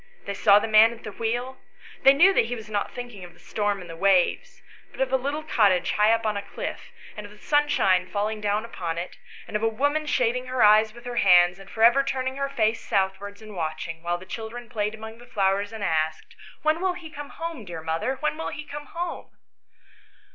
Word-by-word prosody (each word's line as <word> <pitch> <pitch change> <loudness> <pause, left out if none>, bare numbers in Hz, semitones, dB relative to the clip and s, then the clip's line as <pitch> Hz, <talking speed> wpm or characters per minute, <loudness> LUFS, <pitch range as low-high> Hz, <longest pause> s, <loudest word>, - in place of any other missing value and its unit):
They 200 - -3
saw 200 0 +5
the 210 - +1
man 220 +1 +6
at 235 - -15
the 210 - -6
wheel 240 +5 -3 0.4
They 270 - +8
knew 365 +7 +6
that 230 - +3
he 245 +2 -3
was 215 -2 -10
not 205 -1 -2
thinking 245 -6 -8
of 175 -1 -11
the - - -23
storm 205 -2 -2
and 180 - -10
the 165 - -8
waves, 185 0 +1 0.3
but - - -15
of 265 0 0
a - - +6
little 285 +4 -2
cottage 205 - +2
high 210 +1 +3
up 230 0 +2
upon 215 -2 -1
a - - -2
cliff, - - -7 0.2
and 210 - -7
of - - -16
the 210 - -15
sunshine 210 -10 +2
falling 210 +2 -2
down 210 +1 0
upon 170 -7 -5
it, 175 +1 -6 0.3
and - - -8
of 210 - 0
a 225 - +2
woman 285 +7 0
shading 250 -1 0
her 255 -2 +1
eyes 215 +1 +6
with 240 +2 -15
her 245 -1 -5
hands 180 -2 +5
and 195 0 -13
for 225 - -2
ever 240 +4 +7
turning 260 -1 -3
her 275 0 -2
face 225 -4 0
southwards 200 +2 -2
and 215 -2 -10
watching, 160 0 -4
while 175 +1 -1
the 185 - -12
chil 220 +4 -6
dren 240 0 -9
played 215 -2 -2
among 220 +1 -10
the 240 - -15
flowers 200 -2 0
and 220 -2 -6
asked, 160 -2 -1
" - - -23
When 310 +2 +2
will 370 -1 +1
he 340 -3 -10
come 290 -1 -8
home, 330 -7 -6
dear 170 -4 -8
mother? 165 +12 -1
when 300 0 0
will - - -3
he 300 - -7
come 295 0 -8
home 345 0 -5
220 Hz, 235 wpm, -25 LUFS, 195-255 Hz, 0.4 s, They